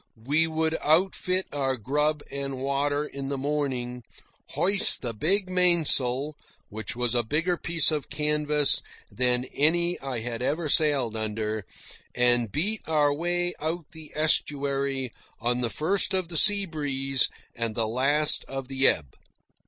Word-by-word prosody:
We 155 +4 +2
would 160 0 -1
outfit 185 +3 +1
our 135 -2 -1
grub 150 +6 -1
and 140 -1 -4
water 140 +2 -1
in 140 -2 -6
the 140 - -2
morning, 130 -4 -3 0.5
hoist 195 +2 +3
the 120 -2 -3
big 185 - +2
mainsail 155 -7 +2 0.4
(which 110 +1 -5
was 120 -1 -1
a 120 - +3
bigger 160 +10 -1
piece 165 -2 +1
of 150 -2 -3
canvas 150 0 +2 0.3
than 125 0 +1
any 170 +4 +2
I 130 -4 -4
had 115 0 -5
ever 155 +4 -1
sailed 140 -7 +3
under), 110 -1 -3 0.5
and 120 -2 +2
beat 200 - -1
our 150 -2 +2
way 175 +3 -1
out 160 +1 -4
the 160 -1 -11
estuary 140 -4 0 0.3
on 120 +1 -1
the 120 - 0
first 180 - 0
of 185 -3 -1
the 170 - -7
seabreeze 145 -9 +2 0.3
and 115 -2 -3
the 115 -2 0
last 140 +6 +3
of 135 -1 -7
the 135 0 +2
ebb. 70 -5 0
145 Hz, 145 wpm, -26 LUFS, 125-160 Hz, 0.5 s, hoist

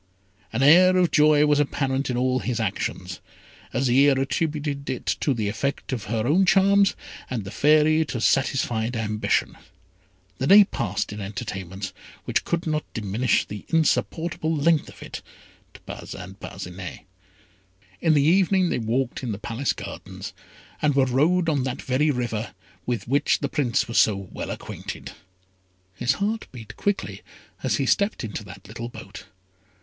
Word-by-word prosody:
An 115 +4 0
air 185 +5 +7
of 180 -2 +3
joy 150 0 +5
was 150 -1 +3
apparent 135 -1 0
in 125 - -1
all 130 +1 +1
his 120 -1 -2
actions. 100 -4 -3 0.5
Azire 135 +2 +3
attributed 145 0 -2
it 130 - -4
to 145 - +1
the 110 -5 -1
effect 140 +6 -2
of 115 -5 -4
her 110 0 -1
own 165 +9 +4
charms, 195 +1 +4 0.3
and 120 -5 -3
the 95 - -8
Fairy 155 +5 +4
to 125 - -4
satisfied 120 -2 +1
ambition. 105 -1 0 0.8
The 130 - 0
day 205 +3 +9
passed 105 - -3
in 105 - -6
entertainments 95 -2 -5 0.3
which - - 0
could 170 0 -1
not 155 -2 -1
diminish 110 +3 +1
the 105 0 -8
insupportable 160 0 0
length 155 +1 +2
of - - -12
it - - -7 0.5
to - - -13
Parcin - - -8
Parcinet. 90 0 -7 1.0
In 160 -2 +4
the 145 - +4
evening 185 +2 +3
they - - 0
walked 120 +2 -1
in 125 -4 -3
the - - -5
Palace 120 +5 -2
gardens, 95 +2 -8 0.5
and 145 -2 +2
were 135 -1 +4
rowed 160 +8 +2
on 145 -4 +2
that 130 -1 -3
very 135 +4 +1
river 120 -5 -2 0.3
with 120 -2 -2
which 140 +3 +2
the 140 - -3
Prince 135 -6 0
was 115 - +2
so 105 - +4
well 95 -1 -7
acquainted. - - -7 0.8
His 120 +7 +1
heart 210 +7 -2
beat 110 -4 -10
quickly 205 0 -2 0.4
as - - +1
he - - 0
stepped 200 -7 +1
into 105 -1 -5
that 95 +1 -12
little 115 +3 -6
boat. - - -10
130 Hz, 155 wpm, -24 LUFS, 110-155 Hz, 1.0 s, day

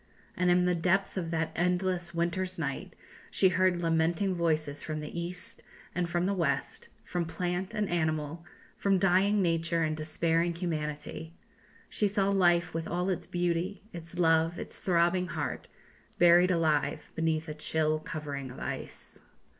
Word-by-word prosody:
And 180 -1 +2
in 180 0 +4
the 180 - +3
depth 185 +3 +1
of 175 -4 -2
that 160 -1 -1
endless 180 0 0
winter's 175 +2 -1
night 145 -4 -4 0.3
she 190 - +4
heard 180 -1 +2
lamenting 165 +4 +2
voices 155 -4 0
from 155 -1 -4
the 150 0 -7
east 180 +7 -4 0.3
and 175 -1 -1
from 175 +1 0
the 200 - +1
west, 170 -7 -1
from 175 +1 -2
plant 180 +5 -3
and 210 -1 0
animal, 160 -1 -1 0.3
from 195 -1 +2
dying 195 +2 +3
nature 165 -1 +1
and 155 0 0
despairing 165 +2 0
humanity; 160 -1 -4 0.5
she 210 - +1
saw 200 -1 +1
life 175 -3 +3
with 165 0 -3
all 180 +2 -1
its 180 - -3
beauty, 175 +2 -1
its 170 +1 -8
love, 165 0 +3
its - - -6
throbbing 180 0 +2
heart, - - -4 0.5
buried 175 +1 +6
alive 160 -4 +1
beneath 160 0 0
a 155 - -4
chill 155 0 0
covering 145 -4 -5
of 125 - -10
ice." - - -6
170 Hz, 155 wpm, -30 LUFS, 160-180 Hz, 0.5 s, buried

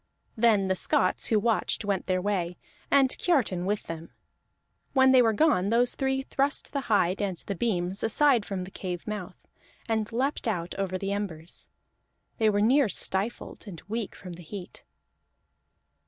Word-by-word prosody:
Then 220 -4 +3
the 190 - +2
Scots 185 0 +1
who 220 - +3
watched 215 -1 0
went 200 -2 -1
their 185 -1 0
way, 180 -4 -1 0.3
and 275 -1 +5
Kiartan 215 - +1
with 205 +1 -1
them. 165 0 -7 0.8
When 265 -1 +5
they 260 -1 +7
were 225 -2 +4
gone, 215 - +2
those 240 +2 +3
three 265 -1 -1
thrust 280 +2 -1
the 280 - -1
hide 195 -3 +2
and 195 -3 -2
the 200 - -5
beams 190 -2 -1
aside 245 +1 +3
from 195 -3 -4
the 185 - -9
cave 180 -3 -5
mouth, 205 -3 -5 0.5
and 220 -2 -1
leaped 260 +3 -1
out 175 -5 -2
over 190 -1 -1
the 195 +1 -2
embers. 180 -5 -6 0.7
They 220 -1 +4
were 205 -1 +1
near 255 +3 +4
stifled, 200 +6 -1
and 175 -5 -8
weak 225 0 -4
from 180 -2 -9
the 175 - -10
heat. 180 +2 -9
205 Hz, 165 wpm, -27 LUFS, 185-235 Hz, 0.8 s, they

